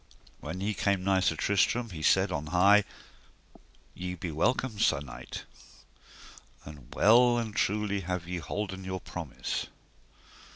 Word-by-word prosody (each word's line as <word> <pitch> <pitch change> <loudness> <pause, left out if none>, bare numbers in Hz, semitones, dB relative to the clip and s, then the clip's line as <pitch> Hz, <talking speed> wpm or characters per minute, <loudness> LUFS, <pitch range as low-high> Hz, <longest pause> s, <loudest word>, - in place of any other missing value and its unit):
When 80 +5 -6
he 105 +2 0
came 100 -2 0
nigh 95 0 +3
Sir 90 -3 +1
Tristram 105 +6 +1
he 80 -3 -7
said 95 +4 +3
on 75 -2 -3
high: 100 +5 +5 1.1
Ye 90 0 -5
be 85 -1 -5
welcome, 110 - 0
sir 80 -8 +3
knight, 65 -3 -8 1.2
and 75 -4 -12
well 120 +3 +5
and 110 -3 -3
truly 105 0 0
have 90 -1 -4
ye 90 0 -3
holden 95 +3 -4
your 95 0 -4
promise. 80 -6 -5
95 Hz, 135 wpm, -29 LUFS, 85-105 Hz, 1.2 s, high